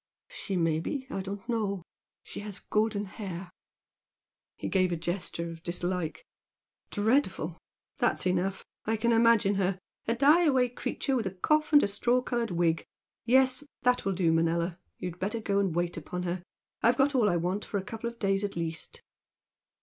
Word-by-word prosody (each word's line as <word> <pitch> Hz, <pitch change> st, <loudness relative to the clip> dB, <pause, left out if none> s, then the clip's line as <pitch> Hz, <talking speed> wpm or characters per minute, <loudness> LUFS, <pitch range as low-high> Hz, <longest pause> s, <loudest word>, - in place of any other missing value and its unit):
"She 225 Hz, -, -4 dB
may 165 Hz, -2 st, +2 dB
be. 265 Hz, -, -3 dB
I 195 Hz, -, -2 dB
don't 195 Hz, +2 st, -6 dB
know. 205 Hz, -6 st, -1 dB, 0.4 s
She -, -, -8 dB
has 205 Hz, -1 st, -6 dB
golden 210 Hz, -1 st, 0 dB
hair." 190 Hz, -3 st, -7 dB, 1.1 s
He -, -, -4 dB
gave 185 Hz, -2 st, +2 dB
a -, -, +1 dB
gesture 170 Hz, 0 st, -3 dB
of 165 Hz, 0 st, -10 dB
dislike. 175 Hz, -, -2 dB, 0.6 s
"Dreadful! 225 Hz, +8 st, +1 dB, 0.4 s
That's -, -, +1 dB
enough! 185 Hz, +1 st, 0 dB, 0.2 s
I 225 Hz, +1 st, +1 dB
can 235 Hz, +2 st, +2 dB
imagine 230 Hz, -3 st, +5 dB
her, 190 Hz, 0 st, +1 dB, 0.3 s
a 230 Hz, -, +2 dB
die 295 Hz, +7 st, +5 dB
away 260 Hz, -5 st, +3 dB
creature 265 Hz, +2 st, -2 dB
with 225 Hz, -6 st, 0 dB
a -, -, -3 dB
cough 305 Hz, -, +2 dB
and 290 Hz, -1 st, +7 dB
a -, -, +3 dB
straw 240 Hz, +5 st, +2 dB
coloured 240 Hz, -2 st, -1 dB
wig. 170 Hz, -2 st, +1 dB, 0.4 s
Yes! 260 Hz, +2 st, +4 dB, 0.2 s
that 250 Hz, 0 st, +3 dB
will 195 Hz, -, 0 dB
do, 175 Hz, -3 st, +2 dB
Manella! 170 Hz, +2 st, +1 dB, 0.2 s
You'd 180 Hz, -1 st, -5 dB
better 205 Hz, +5 st, -1 dB
go 200 Hz, -2 st, +1 dB
and 190 Hz, -5 st, 0 dB
wait 175 Hz, 0 st, 0 dB
upon 180 Hz, +3 st, -4 dB
her. 175 Hz, 0 st, -2 dB, 0.4 s
I've 240 Hz, +2 st, +4 dB
got 280 Hz, +1 st, +3 dB
all 235 Hz, -6 st, +4 dB
I 175 Hz, -, +2 dB
want 180 Hz, +5 st, -1 dB
for 205 Hz, -, -3 dB
a 190 Hz, -, -2 dB
couple 225 Hz, +3 st, -4 dB
of 235 Hz, -, -13 dB
days 195 Hz, -2 st, +1 dB
at 200 Hz, -, -2 dB
least." 165 Hz, -1 st, -5 dB
200 Hz, 180 wpm, -29 LUFS, 175-235 Hz, 1.1 s, and